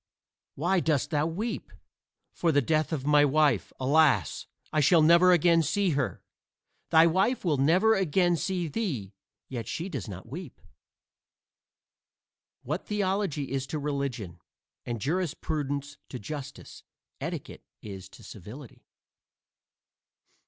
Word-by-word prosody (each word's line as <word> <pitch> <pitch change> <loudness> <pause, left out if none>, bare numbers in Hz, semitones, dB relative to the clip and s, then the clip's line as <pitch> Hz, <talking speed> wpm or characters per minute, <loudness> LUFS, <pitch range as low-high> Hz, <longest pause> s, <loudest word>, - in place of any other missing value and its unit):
"Why 180 +6 +1
dost 155 -4 0
thou 150 0 +1
weep?" 210 +8 -4 0.6
"For 170 - +1
the 145 - +4
death 155 +4 +1
of 140 -4 -3
my 150 0 +5
wife. 150 +1 +2
Alas! 145 +2 +2 0.3
I 155 - +2
shall 160 +2 +5
never 170 +3 +6
again 170 -1 +4
see 190 +4 +1
her!" 140 -4 -2 0.7
"Thy 160 0 +6
wife 190 +8 +1
will 155 -5 +2
never 180 +11 +4
again 180 -2 +2
see 180 0 -2
thee, 140 - -3 0.3
yet 115 -4 -5
she 170 +9 -4
does 135 - -5
not 95 +1 -8
weep." 150 +3 -8 2.0
What 155 +7 -4
theology 190 -9 -1
is 135 -1 -2
to 155 - -3
religion 140 - -3 0.5
and 120 -2 -3
jurisprudence 145 - -2
to 125 - -6
justice, 145 +5 -8 0.4
etiquette - - -6 0.2
is 95 -2 -8
to - - -16
civility. 110 +7 -11
150 Hz, 125 wpm, -28 LUFS, 135-175 Hz, 2.0 s, never